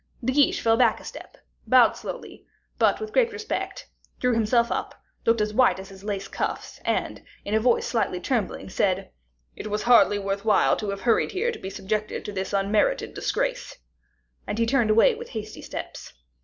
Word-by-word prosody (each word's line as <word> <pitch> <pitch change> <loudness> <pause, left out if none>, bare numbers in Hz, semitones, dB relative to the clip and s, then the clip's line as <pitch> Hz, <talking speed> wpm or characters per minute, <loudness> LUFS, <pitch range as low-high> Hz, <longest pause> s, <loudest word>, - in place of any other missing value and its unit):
De 260 - +1
Guiche 290 0 +3
fell 225 0 +3
back 235 -3 +3
a - - -14
step, - - -10 0.3
bowed - - +6
slowly, - - -8 0.4
but - - +3
with 430 0 -6
great 475 -2 +3
respect, 440 +3 -5 0.3
drew 250 -1 +2
himself 235 +1 +2
up, - - -3 0.3
looking 230 -1 +4
as 210 0 -3
white 255 -1 +4
as 190 +1 -9
his 195 0 -13
lace 200 -2 -3
cuffs, - - -4
and, - - -1 0.2
in 205 - -3
a 220 - +4
voice 240 +1 +2
slightly 220 -6 -1
trembling, 230 +1 -2
said, 190 0 -1 0.4
"It - - -7
was 210 0 -2
hardly 235 -4 +5
worth 200 0 -3
while 215 -3 +4
to 210 - -4
have 200 0 -4
hurried 230 - +2
here 445 +5 0
to - - -8
be 190 - -6
subjected 210 +2 -3
to - - -4
this 190 -1 -4
unmerited 205 - +1
disgrace." - - -2 0.7
And 210 - -3
he 230 - +2
turned 235 -2 +2
away 230 - +5
with 465 +2 -9
hasty 215 -2 -7
steps. - - -7
220 Hz, 190 wpm, -25 LUFS, 205-255 Hz, 0.7 s, bowed